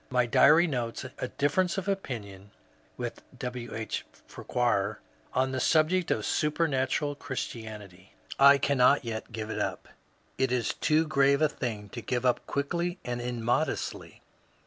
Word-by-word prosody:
My 125 -1 +2
diary 150 +8 +6
notes 120 -7 -3 0.2
*^a - - -3
difference 170 +6 +1
of 195 0 -3
opinion 105 - -4 0.5
[with - - -5 0.2
W. 125 -2 -5
H. 110 -1 -3 0.2
Farquhar] 105 -4 -1 0.4
on 130 +1 +2
the 130 - -2
subject 165 +6 +2
of - - 0
Supernatural 150 -2 0
Christianity. 105 -8 -7 0.2
I 140 +1 +8
cannot 140 0 +3
yet 115 0 -5
give 110 -1 -5
it - - -3
up. - - -3 0.5
It 130 -1 +2
is 125 -2 0
too 155 +1 +2
grave 140 -2 +3
a - - +6
thing 110 -7 -4
to 120 - -7
give 125 +1 -2
up 125 - +1
quickly 170 +5 -1
and 120 0 -3
immodestly. 120 +5 -2
130 Hz, 145 wpm, -28 LUFS, 115-150 Hz, 0.5 s, I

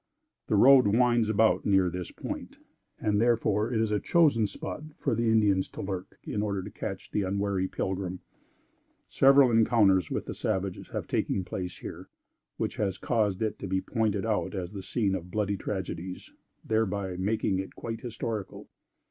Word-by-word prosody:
The - - +1
road 130 +2 +7
winds 120 +1 +3
about 110 +1 +3
near 95 -2 +3
this 90 0 -4
point, - - -7 0.4
and 105 0 +1
therefore 115 -2 +2
it 115 - +1
is 110 -1 +1
a 105 - +2
chosen 145 - +3
spot 100 - -6 0.2
for - - -1
the 115 0 +1
Indians 105 -4 +3
to - - -7
lurk, 95 -1 -5
in 105 - -3
order 100 -3 -2
to - - -8
catch - - -6
the 105 - 0
unwary 100 0 0
pilgrim. 95 -1 -3 0.9
Several 135 -1 +5
encounters 110 -5 +4
with - - -3
the - - -5
savages 95 -1 -2
have - - -4
taken 95 - -1
place 90 0 -5
here, - - -9 0.5
which - - -3
has 100 -2 -1
caused 110 -4 0
it 110 - -2
to - - -5
be 95 0 0
pointed 105 -1 -1
out 110 -1 -1
as 90 0 -4
the 100 - -5
scene 100 0 0
of 90 -2 -4
bloody 100 +1 -1
tragedies, 95 -2 -5 0.3
thereby 100 -4 0
making 95 0 0
it 95 - -6
quite 115 -1 -5
historical. 115 -3 -5
105 Hz, 170 wpm, -28 LUFS, 95-110 Hz, 0.9 s, road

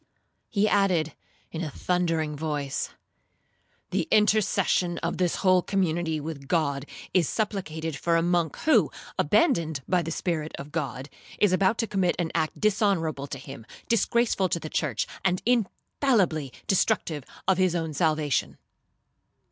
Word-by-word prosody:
He 210 0 +2
added, 180 -7 +2 0.4
in 165 +1 -4
a 155 - -3
thundering 165 -2 -1
voice, 145 -2 -2 1.0
'The - - 0
intercession 210 -4 +2
of - - -2
this 180 -2 +1
whole 185 -2 +4
community 170 -4 0
with 145 -2 -7
God 145 -4 0 0.3
is 175 -5 +3
supplicated 165 -8 -2
for 170 +4 +1
a 165 - +3
monk 175 -3 +1
who, 315 - +4 0.3
abandoned 170 - +2
by 180 -2 +2
the 165 - -4
Spirit 160 -2 -2
of 140 +2 -8
God, 135 -4 -3 0.3
is 205 -3 +3
about 190 +4 +3
to 230 - +1
commit 190 -5 +1
an 165 -2 -1
act 160 -2 -1
dishonourable 190 -9 +1
to 140 - -6
Him, 135 -2 -10 0.2
disgraceful 230 -4 +2
to 170 - 0
the 155 - -7
church, 140 -8 0 0.2
and 185 -1 +1
infallibly 210 - +1
destructive 160 -5 +1 0.2
of 190 -1 +3
his 185 -2 +3
own 165 -2 -2
salvation.' 155 -2 0
170 Hz, 140 wpm, -26 LUFS, 155-190 Hz, 1.0 s, whole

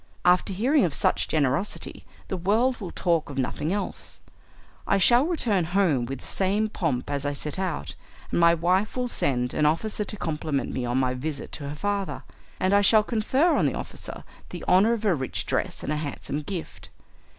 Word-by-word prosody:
After 180 +3 +4
hearing 250 +10 +3
of 165 -6 +1
such - - +1
generosity 145 +5 -1 0.2
the - - -2
world 220 +8 +2
will 190 - -4
talk 170 -4 0
of 140 - -7
nothing 140 +4 -1
else. 205 +1 -4 0.7
I 195 - +3
shall 240 - +5
return 230 - +1
home 155 -11 +3
with 135 0 -5
the - - -14
same 200 +3 +1
pomp 145 -10 -2
as 140 -1 -1
I 145 0 -1
set 150 +4 -2
out, 185 -2 -3 0.4
and - - +1
my 170 0 +6
wife 185 +7 +1
will 250 0 0
send 125 - 0
an 150 - +3
officer 210 +7 0
to 210 +1 -6
compliment 150 -6 -2
me 125 - -2
on 120 +1 0
my 130 -1 +1
visit 140 +3 -5
to 140 -2 -6
her 145 - -5
father, 200 +3 -2 0.4
and 185 +1 +2
I 200 - +6
shall 215 +1 +5
confer 255 +10 +2
on - - +3
the - - -1
officer - - -7 0.3
the - - -7
honour 200 +6 +5
of 225 -2 -3
a 200 - +4
rich 130 -5 -3
dress - - -2
and 150 - -1
a - - -1
handsome 150 0 -4
gift. 170 +2 -7
180 Hz, 195 wpm, -26 LUFS, 145-210 Hz, 0.7 s, my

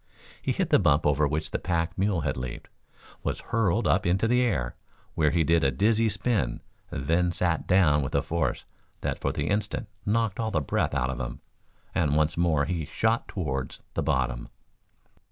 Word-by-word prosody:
He - - -1
hit - - -1
the - - +6
bump 75 -4 +3
over 75 0 +3
which 75 +2 -2
the - - -1
pack 85 -2 -1
mule 95 -3 +1
had - - -1
leaped, 65 -2 -6 0.5
was - - -2
hurled 115 -1 0
up 95 - +3
into 95 +5 +2
the 125 +2 +3
air, 70 - 0 0.4
where 75 -2 +3
he 85 +1 +2
did 85 +1 +3
a 70 - +4
dizzy 110 - +2
spin, 100 - 0 0.3
then 85 +6 +1
sat 85 -1 -1
down 85 -6 +4
with 65 - -3
a - - +2
force 85 0 -1 0.4
that - - -2
for - - 0
the - - -2
instant 105 0 -1 0.2
knocked 110 -1 0
all 110 -1 0
the 85 - +1
breath 70 0 -1
out 65 -1 +1
of 65 - -5
him, - - -5 0.5
and 75 -4 +1
once 75 +1 +2
more 80 -4 +2
he 85 0 -2
shot 115 +9 0
towards 70 -8 -3
the - - -1
bottom. 60 -2 -1
85 Hz, 190 wpm, -27 LUFS, 70-100 Hz, 0.5 s, the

